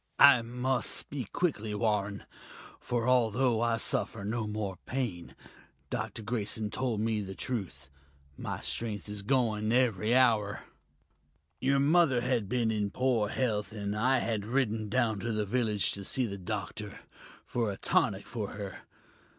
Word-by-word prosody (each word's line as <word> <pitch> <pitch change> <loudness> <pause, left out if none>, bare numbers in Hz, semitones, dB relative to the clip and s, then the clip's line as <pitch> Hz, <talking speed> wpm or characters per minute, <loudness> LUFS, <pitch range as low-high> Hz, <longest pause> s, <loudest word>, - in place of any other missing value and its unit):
"I 125 -4 +8
must 125 +3 -1
speak 135 -6 -2
quickly, 110 -12 -1
Warren, 105 -2 0 0.6
for 120 0 -1
although 120 -1 +3
I 115 -1 +2
suffer 110 -1 0
no 110 +1 -2
more 105 -3 -3
pain, 120 -10 -3 0.6
Dr. 110 - -3
Grayson 110 -1 -2
told 125 -5 -1
me 110 -1 0
the 95 -1 -6
truth 95 - -4 0.4
my - - -5
strength 110 -3 -3
is 105 0 -4
going 110 -2 +1
every 120 -2 +2
hour. 110 -5 +3 1.0
Your 140 +1 +2
mother 140 -3 +4
had 120 -5 0
been 120 -3 +1
in 105 -2 0
poor 120 -3 +1
health, 110 -4 -1
and 100 -1 -3
I 130 +5 +3
had 115 -4 -1
ridden 110 -2 0
down 115 -4 +1
to 115 +3 -2
the 105 -1 0
village 105 -1 +1
to 100 - -4
see 130 +6 0
the 100 -3 -5
doctor, 105 +1 -5 0.4
for 115 -4 -1
a 95 - -6
tonic - - +1
for - - -5
her. - - -6
110 Hz, 150 wpm, -30 LUFS, 105-125 Hz, 1.0 s, I